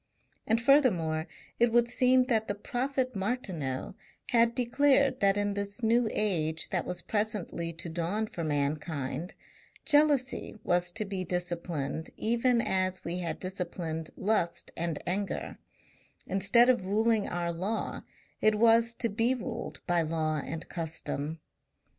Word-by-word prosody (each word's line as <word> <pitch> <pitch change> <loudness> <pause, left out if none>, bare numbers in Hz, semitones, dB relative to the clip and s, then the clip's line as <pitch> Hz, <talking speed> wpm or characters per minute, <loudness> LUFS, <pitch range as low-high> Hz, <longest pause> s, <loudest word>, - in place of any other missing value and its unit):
And 225 +1 +3
furthermore 185 - +3 0.3
it 235 0 +4
would 240 0 +4
seem 255 +1 +4
that 225 -4 +1
the 205 - -1
prophet 255 +4 -2
Martineau 190 - -3 0.4
had 235 -1 +3
declared 270 +2 +3
that 195 0 +3
in 205 0 0
this 200 +3 -4
New 230 +1 +3
Age 165 -6 -1
that - - -1
was 180 -1 -4
presently 205 -6 -2
to 170 +1 -6
dawn 175 +6 -1
for 175 -5 -6
mankind, 150 +2 -2 0.5
jealousy 290 -6 +2
was 175 0 +1
to 215 +1 -2
be 195 -2 -3
disciplined 170 -4 -3
even 235 +2 +2
as 185 -3 0
we 175 +2 -3
had 170 -2 -3
disciplined 175 -4 -4
lust 195 -5 0
and 165 -2 -2
anger; 195 +3 -3 0.7
instead 195 +6 +4
of 250 -6 +3
ruling 220 +1 +2
our 170 0 -2
law 195 +6 -3 0.4
it 215 0 +4
was 230 +1 +4
to 230 - -1
be 230 +4 +1
ruled 245 - -6
by 175 -2 +2
law 155 -1 0
and 165 0 -6
custom. 160 -2 -4
195 Hz, 135 wpm, -30 LUFS, 170-235 Hz, 0.7 s, it